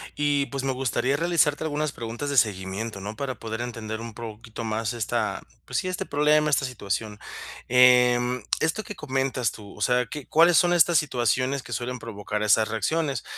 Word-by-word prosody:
Y, 145 -1 +1
pues, 135 -1 -4
me 135 - 0
gustaría 130 +1 0
realizarte 165 -2 +2
algunas 150 -1 -1
preguntas 120 +5 -5
de 140 - -1
seguimiento, 100 0 0
¿no?, 105 +2 -6
para 130 0 -4
poder 115 +1 -5
entender 115 -2 -5
un 115 -1 -7
poquito 115 0 -8
más 110 +1 -2
esta, 115 -3 -2 0.2
pues, - - -3
sí, 185 - -3
este 185 - -3
problema, 150 +1 +3
esta 140 -2 +2
situación. 105 -3 -4 0.5
Em, 125 -1 +5 0.2
esto 165 +7 0
que 210 - -8
comentas 130 -5 -1
tú, 105 -2 -12
o - - -12
sea, 125 0 +2
¿qué 150 +1 -7
cuáles 170 +2 +5
son 175 -1 +4
estas 170 0 +5
situaciones 130 -1 0
que 120 - -7
suelen 125 +2 -3
provocar 105 -1 -5
esas 110 +1 +4
reacciones? 135 +5 -1
125 Hz, 180 wpm, -25 LUFS, 110-145 Hz, 0.5 s, Em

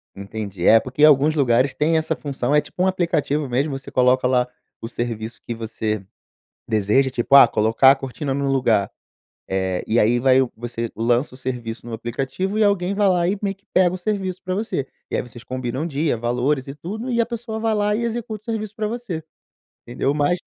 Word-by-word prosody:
Entendi. 100 -2 -5
É, 115 - +7
porque 130 +5 -2
alguns 150 +1 +6
lugares 130 -1 +2
têm 160 +2 +2
essa 160 0 0
função, 135 0 -2
é 150 - +5
tipo 180 - -7
um - - +3
aplicativo 155 -6 0
mesmo, 135 +3 0
você 135 0 -11
coloca 125 0 +3
lá 125 -1 +2 0.3
o 115 - -5
serviço 115 -2 -5
que 120 - -3
você 110 -3 -3 0.6
deseja, 110 +5 +2
tipo: 125 +2 0
"Ah, 135 - +10
colocar 115 +5 +4
a - - -2
cortina 135 +1 -4
no 140 0 -1
lugar", 115 -7 +2 0.6
eh, 95 -1 -1
e 115 +2 +1
aí 120 +3 +4
vai 130 0 +4 0.2
você 115 0 -4
lança 120 +3 0
o - - -12
serviço 120 -3 -5
no 115 - -5
aplicativo 135 - -3
e 220 - +4
alguém 200 -1 +1
vai 205 -1 +3
lá 175 -2 +2
e 195 +2 -1
meio 195 -1 -1
que 195 - -37
pega 185 -1 +3
o - - -4
serviço 190 -1 -2
pra 185 0 -2
você, 195 -10 -2 0.2
e - - -1
aí - - 0
vocês 120 -1 -12
combinam 130 +3 -3
o - - -2
dia, 150 -3 0
valores 125 +4 0
e 135 - -6
tudo, 215 - -6
e 235 -1 +1
a 230 - +2
pessoa 230 -2 -5
vai 220 -1 0
lá 210 0 +1
e 235 - -2
executa 225 -2 -4
o - - 0
serviço 215 -1 -4
pra 215 -2 -1
você, 215 -9 -5 0.6
entendeu? 130 +3 -1
Mas 150 +4 +1
135 Hz, 210 wpm, -22 LUFS, 120-185 Hz, 0.6 s, Ah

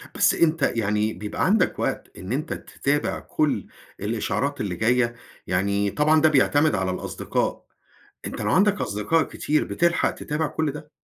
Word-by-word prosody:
بس - - +4
أنت 165 -1 +2
يعني 105 0 0
بيبقى 105 +2 -3
عندك 210 +4 +2
وقت - - -3
إن 95 +3 -7
أنت 150 +5 -2
تتابع 145 +1 -2
كل 155 -1 -1 0.3
الإشعارات 115 +6 -2
اللي 95 -4 -2
جاية؟ 120 +4 +2 0.3
يعني 100 +2 +1
طبعًا 155 +4 +3
ده 155 - +6
بيعتمد 145 +1 +3
على 95 -1 0
الأصدقاء، 90 - -3 0.6
أنت - - -5
لو - - 0
عندك 205 +1 +3
أصدقاء 105 +11 +1
كتير، 150 +1 -1
بتلحق 175 0 +1
تتابع 150 +2 -3
كل 155 -1 -2
ده؟ 150 +1 -10
140 Hz, 150 wpm, -24 LUFS, 105-155 Hz, 0.6 s, ده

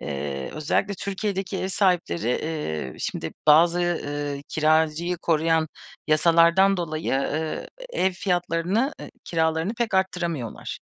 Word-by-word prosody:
eee, 70 -1 -4
özellikle 155 +6 0
Türkiye'deki 195 0 -3
ev 190 - -2
sahipleri, 180 - +1
eee, 125 - -2
şimdi 80 - -4
bazı, 170 +3 +6
ııı, 145 -4 -2
kiracıyı 160 +2 +2
koruyan 160 -1 +1 0.4
yasalardan 170 +5 +5
dolayı, 160 -4 -3
ııı, 155 +3 -2 0.2
ev 190 - +1
fiyatlarını, 180 - 0
eee, - - -8
kiralarını 160 +5 0
pek 235 -3 -1
arttıramıyorlar. 170 - -2
165 Hz, 110 wpm, -24 LUFS, 155-185 Hz, 0.4 s, bazı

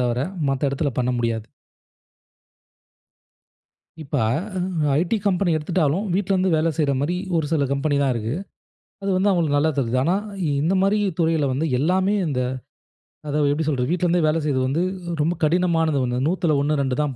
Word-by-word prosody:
தவிர, 120 0 0 0.3
மத்த 135 +1 0
இடத்துல 140 +1 -1
பண்ண 125 0 +1
முடியாது. 115 -2 -1 2.6
இப்ப 145 -1 -10
அ 120 - +1 0.6
ஐடி 180 +6 0
கம்பெனி 185 -2 +2
எடுத்துட்டாலும், 165 +4 0
வீட்ல 195 0 0
இருந்து 185 0 +2
வேலை 160 +1 +2
செய்ற 145 -3 +2
மாரி 165 +6 -1 0.2
ஒரு 160 -2 0
சில 145 -3 +2
கம்பெனி 145 +1 0
தான் 140 -1 +2
இருக்கு. 115 +3 -3 0.7
அது 195 - -2
வந்து 195 +2 +2
அவுங்களுக்கு 160 -5 +1
நல்லா 155 +2 +2
தருது. 125 -2 0
ஆனா 175 +5 +2 0.5
இந்த 175 +5 +2
மாதிரி 195 +2 +2 0.2
துறையில 160 -4 +2
வந்து 145 +5 -1
எல்லாமே 185 +7 +2
இந்த 130 -4 -1 0.9
அதாவது 145 0 +1
எப்படி 155 +2 -1
சொல்றது? 125 -3 -1
வீட்லருந்தே 175 0 +1
வேலை 155 +2 +2
செய்றது 130 -3 +1
வந்து, 160 +6 0 0.4
ரொம்ப 165 +3 +1
கடினமானது 165 -2 +2
1, 125 0 -2
100துல 170 -2 +1
1 150 +1 +1
2 130 -1 -1
தான் 145 -3 -2
155 Hz, 160 wpm, -22 LUFS, 140-175 Hz, 2.6 s, கம்பெனி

